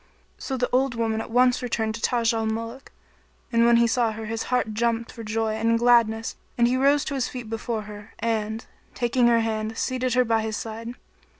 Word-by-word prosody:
" - - -39
So 265 - -3
the 250 0 0
old 260 0 +2
woman 225 -1 -1
at - - -8
once 250 +2 +3
returned 225 -3 -1
to 225 - -7
Taj 235 -1 +2
al 225 -1 -1
Muluk, 230 +4 -5 0.6
and 230 0 +4
when 235 0 +6
he 235 - +5
saw 230 -1 +1
her 220 +1 -6
his 225 +1 -3
heart 250 -3 0
jumped 230 +1 -1
for 230 - -9
joy 220 0 -1
and 230 +1 +1
gladness 230 -2 +3 0.2
and 235 0 +4
he 250 - +1
rose 280 +2 +3
to 280 - -3
his 265 -3 -1
feet 240 -3 -7
before 225 -1 -3
her 210 +1 -11
and, 220 -1 -2 0.3
taking 240 0 +2
her 235 -1 +4
hand, 220 0 -2
seated 255 -1 -1
her 250 0 +4
by 225 -1 +2
his 220 -1 -3
side. 230 +2 -6
230 Hz, 215 wpm, -25 LUFS, 220-245 Hz, 0.6 s, when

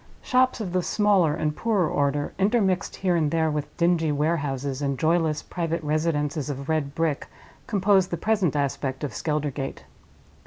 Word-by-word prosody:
Shops 255 0 +2
of 190 -5 -4
the 185 - +2
smaller 190 -6 +2
and 150 -1 -1
poorer 205 -5 +1
order, 145 0 0
intermixed 195 -2 +1
here 185 -2 0
and 155 -3 +2
there 160 0 +1
with 150 0 -4
dingy 170 -2 +2
warehouses 145 -3 -1
and 140 -2 -1
joyless 160 +1 +1
private 165 -1 -3
residences 150 -1 -1
of 140 0 -5
red 150 -3 -1
brick, 160 -3 -1 0.4
compose 195 -2 +3
the 170 - -3
present 195 -5 +1
aspect 140 -1 -2
of 140 -6 -3
Skeldergate. 150 -2 -3
160 Hz, 155 wpm, -25 LUFS, 145-180 Hz, 0.4 s, compose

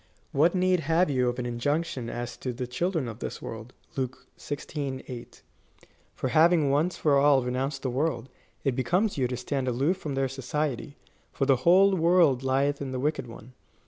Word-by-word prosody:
"What 165 +6 +3
need 185 0 +3
have 165 +2 +2
you 125 -2 +2
of 120 - -4
an 125 - -3
injunction 125 +1 -2
as 120 0 -5
to 130 - -4
the 125 +1 -4
children 160 +3 -1
of 115 0 -7
this - - -5
ivorld, 115 +1 -8 0.3
(Luke 130 -1 -4
xvi. 145 -2 -5
8,) 120 -2 -9 0.7
for 130 - -2
having 155 +1 +4
once 155 +6 +1
for 145 -3 +3
all 140 -2 +5
renounced 135 +3 -2
the 130 - -1
world, 130 -2 -1 0.4
it 135 -4 +1
becomes 175 - +1
you 125 - +2
to 125 0 -4
stand 130 +1 -2
aloof 135 +9 +1
from 150 -7 -5
their 135 0 +1
society; 135 +2 -3 0.3
for 135 - -1
the 135 -1 +4
whole 195 +2 +6
world 165 -6 +4
lieth 135 +2 +1
in 135 -2 -4
the 130 - -2
wicked 145 -2 -1
one." 115 +2 -12
135 Hz, 185 wpm, -27 LUFS, 125-155 Hz, 0.7 s, whole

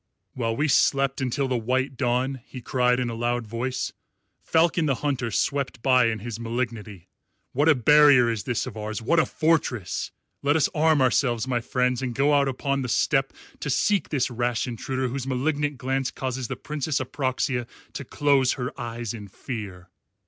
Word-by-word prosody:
"While 115 -2 -1
we 150 +6 +1
slept 135 -1 +2
until 135 +2 0
the 125 -2 0
white 130 +4 -1
dawn," 125 +1 0
he 130 - -8
cried 125 +1 +1
in 125 -2 -1
a - - -5
loud 120 +1 -1
voice, 120 +4 -3 0.5
"Falcon 165 0 +2
the 135 - +2
Hunter 135 -5 0
swept 130 +2 -1
by 130 -3 +5
in 115 -1 -1
his 115 +2 -6
malignity. 115 -5 -4 0.4
What 145 +5 +2
a 155 - +6
barrier 145 -1 +6
is 115 -3 -2
this 125 -3 -1
of 125 -4 -7
ours! 110 0 -4
What 160 +9 +2
a 160 - +2
fortress! 155 - 0 0.3
Let 145 +1 +2
us 160 - +3
arm 155 -2 +3
ourselves, 125 -2 +1
my 125 -2 +1
friends, 125 +1 0
and 125 -3 -3
go 145 +3 +3
out 140 -1 +4
upon 140 +1 -1
the 125 - -3
steppe 135 +2 +1 0.3
to 145 - -4
seek 200 +8 +1
this 135 -3 0
rash 120 +1 -1
intruder 130 +2 -3
whose 130 +1 -4
malignant 145 +2 -1
glance 135 +1 -1
causes 130 -1 -4
the - - -4
Princess 150 -1 -2
Apraxia 130 -2 -2 0.3
to - - -5
close 140 -1 +2
her 125 +1 -4
eyes 120 -1 -4
in 105 -3 -8
fear." 95 -4 -7
130 Hz, 180 wpm, -25 LUFS, 120-140 Hz, 0.5 s, a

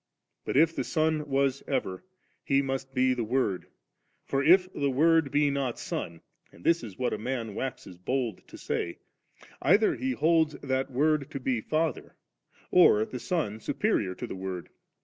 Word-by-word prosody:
But - - -1
if 165 +2 +4
the - - -1
Son 155 -2 0
was 135 0 +1
ever, 125 -9 -2 0.4
He 140 0 +2
must 135 0 -4
be 130 0 +3
the 120 -2 -2
Word; 110 -5 -1 0.6
for 135 0 0
if 180 +5 +6
the 140 -1 0
Word 160 +2 +3
be 145 +1 +2
not 135 -4 -2
Son, 85 -1 -5 0.3
and 85 - -17
thb 170 0 +3
is 105 -5 -9
what 125 - -1
a - - -3
man 115 -2 -3
waxes 100 -7 -6
bold 125 +3 -2
to - - -11
say, 85 - -3 0.6
either 200 +9 +4
be 260 0 -2
holds 160 -5 +2
that 135 0 -1
Word 145 +2 +1
to 140 - -5
be 125 -3 -1
Father 155 +2 -2 0.6
or 110 -12 +6
the 125 - -7
Son 120 - -2
superior 105 - 0
to - - -5
the - - -6
Word. 95 -2 -5
135 Hz, 170 wpm, -28 LUFS, 115-155 Hz, 0.6 s, if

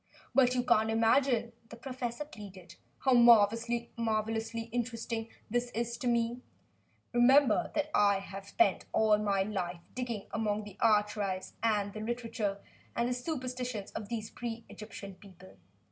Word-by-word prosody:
"But 255 -2 +4
you 245 - +1
can't 220 -2 +3
imagine," 230 +1 +2 0.2
the - - -9
professor 250 +1 -5
pleaded, 195 - -11 0.3
"how 265 - +5
marvelously 230 -1 +3
interesting 230 -1 -3 0.2
this 240 +2 -1
is 235 +1 -1
to 250 - -2
me. 235 +1 +1 0.7
Remember 245 -1 +5
that 300 0 0
I 200 -1 +4
have 195 0 -8
spent 345 - +2
all 215 -1 +4
my 200 -2 +1
life 185 -4 -3
digging 240 -5 -3
about - - -30
among 210 -1 0
the 205 -2 -11
archives 210 -3 +1
and 210 -3 +1
the 215 - -6
literature 225 -3 -3 0.3
and 235 +1 +1
the - - 0
superstitions 250 -5 -4
of 205 - -6
these 220 -2 -4
pre 230 -1 -6
Egyptian 200 -2 -9
peoples. 185 - -16
225 Hz, 145 wpm, -31 LUFS, 210-240 Hz, 0.7 s, how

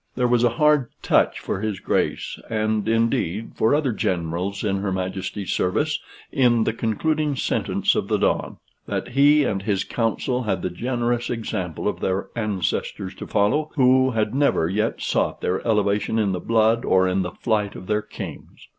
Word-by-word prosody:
There 125 -1 +2
was 120 -1 +3
a 120 - +5
hard 150 -4 +3
touch - - +2
for 95 - -3
his 110 -3 -2
Grace, - - -1
and, 110 -1 0
indeed, 115 -3 0
for 115 +6 +2
other 145 -4 +1
generals 90 0 -2
in 100 -2 0
her 95 0 -2
Majesty's 95 +1 -3
service, 150 +12 0 0.3
in 120 -4 +3
the - - 0
concluding 150 +7 0
sentence 130 - 0
of - - -1
the - - +1
Don: - - 0 0.3
"That - - -3
he 145 +3 +5
and 100 -7 -1
his 100 -1 0
council 125 +2 -1
had 95 -6 -2
the 90 - -1
generous 120 +3 -1
example 95 -8 -3
of - - -1
their 95 +1 -1
ancestors 100 -3 -2
to - - -8
follow, 125 +10 +1
who 130 -1 +4
had 110 -2 -1
never 135 - +2
yet 105 +5 -1
sought - - 0
their 90 - 0
elevation 105 0 +1
in 105 -3 +2
the 90 - -2
blood 115 +3 +2
or 95 0 +3
in 95 +1 +1
the 90 -2 -4
flight 105 -4 -1
of - - -9
their 105 +2 0
kings. - - -9
110 Hz, 175 wpm, -23 LUFS, 95-125 Hz, 0.3 s, a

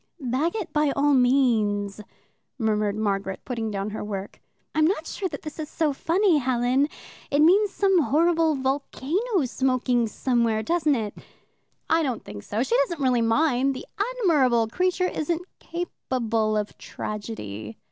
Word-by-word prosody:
"Bag 275 - -1
it 425 -6 -4
by 300 -1 +3
all 285 +1 +3
means," 225 -6 +2 0.6
murmured 210 -3 0
Margaret, 195 -3 -2
putting 230 -3 -3
down 200 0 -3
her 215 - -5
work. 200 -1 -6 0.3
"I'm 310 0 +4
not 330 -3 -1
sure 375 +2 -3
that - - -7
this 305 +1 -8
is 310 -1 -4
so 310 -3 0
funny, 340 +3 +2
Helen. 255 +2 +2 0.4
It 285 +1 +3
means 400 +6 +5
some 385 -2 +3
horrible 325 +2 +2
volcano 285 - -1
smoking 255 -2 +1
somewhere, 230 -1 0
doesn't 310 +1 +2
it?" 215 -4 -3 0.7
"I 325 - +3
don't 260 -7 -2
think 105 -1 -8
so 215 - -2
she 250 -3 0
doesn't 290 +5 0
really 250 -3 +3
mind. 265 +3 +2
The 320 - -7 0.4
admirable 255 - +3
creature 365 +6 +1
isn't 340 0 -2 0.2
capable 230 -10 -2
of 210 -1 -3
tragedy." 110 - -6
260 Hz, 145 wpm, -25 LUFS, 220-315 Hz, 0.7 s, means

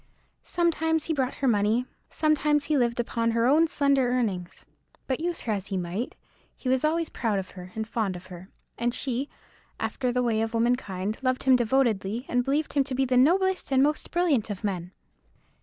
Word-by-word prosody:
Sometimes 320 -2 0
he 325 - -1
brought 265 -3 -1
her 275 - -1
money; 220 +2 +2 0.2
sometimes 300 -1 +2
he 305 - +1
lived 240 -3 +1
upon 230 -1 0
her 230 0 +1
own 305 +6 +5
slender 280 -4 +2
earnings. 205 -8 -2 0.4
But 260 - -1
use 345 +1 -2
her 225 - -2
as 200 -2 -4
he 195 - -2
might, 180 +7 -3 0.4
he - - -7
was 260 +1 +2
always 320 +1 +1
proud 220 -4 -1
of 190 -1 -4
her, 180 -1 -10
and 220 0 -3
fond 215 -5 -1
of 180 +1 -9
her; 185 +1 -11 0.3
and 240 0 0
she, 265 +1 -2 0.5
after 250 -2 -1
the 250 0 0
way 225 -2 +1
of 225 +1 -2
womankind, 220 -4 0
loved 255 -1 0
him 265 -1 +6
devotedly, 235 -2 +1
and 245 0 +1
believed 290 +4 -1
him 280 - +3
to 265 - -4
be 265 +1 +2
the 255 0 0
noblest 365 +6 +3
and 265 0 +4
most 300 +1 0
brilliant 320 -11 +1
of 200 -1 -5
men. 180 -4 -2
250 Hz, 195 wpm, -26 LUFS, 215-285 Hz, 0.5 s, him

